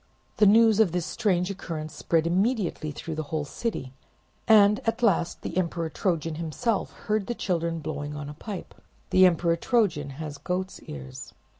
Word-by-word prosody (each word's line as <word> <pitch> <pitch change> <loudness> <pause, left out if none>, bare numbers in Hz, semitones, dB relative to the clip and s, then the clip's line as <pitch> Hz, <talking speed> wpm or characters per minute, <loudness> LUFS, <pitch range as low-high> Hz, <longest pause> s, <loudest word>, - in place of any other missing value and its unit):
The 210 - +6
news 220 +1 +6
of 200 -7 +4
this 180 -2 -1
strange 190 -5 0
occurrence 155 -5 -6
spread 160 +1 +1
immediately 185 -2 0
through 160 +2 -6
the 155 - -2
whole 155 -1 -1
city, 140 - -4 0.5
and 210 -1 +6
at 230 +2 0
last 180 -6 +1
the - - -5
Emperor 170 -2 -1
Trojan 165 -4 -1
himself 195 +7 -1
heard 210 -2 0
the 240 - -2
children 170 -5 -1
blowing 150 -1 -5
on 145 -1 -6
a 150 - -7
pipe: 195 +5 -7 0.4
"The 185 0 +7
Emperor 170 -1 +1
Trojan 175 - +1
has 150 -2 -6
goat's 185 +1 -3
ears!" 65 -2 -9
175 Hz, 165 wpm, -26 LUFS, 155-205 Hz, 0.5 s, The